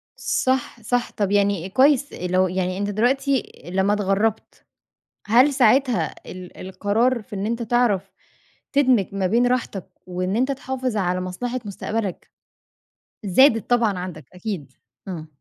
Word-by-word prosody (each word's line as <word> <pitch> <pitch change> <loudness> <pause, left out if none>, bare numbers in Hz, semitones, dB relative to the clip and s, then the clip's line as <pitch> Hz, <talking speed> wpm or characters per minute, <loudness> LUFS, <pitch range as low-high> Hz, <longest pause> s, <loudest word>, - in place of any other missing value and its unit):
صح، 255 -2 -1
صح، 245 +3 -1
طب 200 -2 -1
يعني 200 -3 +1
كويس 280 +5 +3
لو 185 +1 +1
يعني 185 0 -2
أنت 205 0 -2
دلوقتي 265 +5 +1 0.2
لمّا 195 +2 +2
اتغرّبت، 205 +2 -1 0.6
هل 250 +7 +5
ساعتها 255 0 +3 0.2
ال 180 -1 -10
القرار 210 +6 0
في 205 - -10
إن 195 +1 -3
أنت 235 +2 -2
تعرف 230 -4 +1 0.6
تدمج 255 -8 +4
ما 190 -2 +1
بين 235 +5 +3
راحتك 240 -6 -2 0.2
وإن 185 +2 -2
أنت 260 +4 +1
تحافظ 260 -3 -3
على 180 -2 0
مصلحة 240 +8 -4
مستقبلك 205 0 -4 0.9
زادت 225 +3 +4
طبعًا 225 -6 +2
عندك 170 -6 -7
أكيد؟ 180 - -5 0.4
آه. 160 -4 -6
210 Hz, 130 wpm, -22 LUFS, 185-245 Hz, 0.9 s, هل